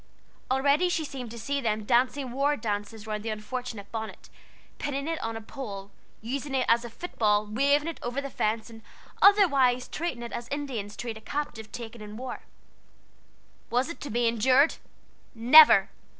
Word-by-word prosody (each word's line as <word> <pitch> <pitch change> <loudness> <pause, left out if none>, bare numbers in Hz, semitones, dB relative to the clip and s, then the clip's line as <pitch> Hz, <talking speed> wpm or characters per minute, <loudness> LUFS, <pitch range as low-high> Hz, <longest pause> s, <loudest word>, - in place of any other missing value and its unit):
Already 280 +7 +3
she 330 -3 -1
seemed 260 -5 -7
to 235 - -9
see 280 +5 -2
them 215 -3 -1
dancing 255 +3 +1
war 280 +3 +1
dances 210 -1 -4
round 215 -1 -3
the 225 - -4
unfortunate 215 -1 -5
bonnet, 220 -1 -6 0.5
pinning 280 0 -3
it 330 -1 -2
on 225 0 -3
a - - -7
pole, 205 -5 -8 0.3
using 270 +4 -3
it 255 - +1
as 235 +1 +4
a 240 - -6
football, 215 -7 0
waving 280 +8 +2
it 330 - -5
over 245 +3 -3
the 275 -1 -5
fence, 220 +1 -1
and 225 0 -12 0.4
otherwise 280 -12 +5
treating 300 -8 -4
it 235 - -7
as 235 - -5
Indians 255 -8 -4
treat 230 -2 -5
a - - -13
captive 225 -6 -5
taken 235 -1 -8
in 210 0 -9
war. 255 0 -6 1.3
Was 250 +5 +1
it 335 - -8
to 290 - -6
be 235 +1 +1
endured? 255 +6 +3 0.6
Never! 235 -3 +8
245 Hz, 170 wpm, -27 LUFS, 220-280 Hz, 1.3 s, Never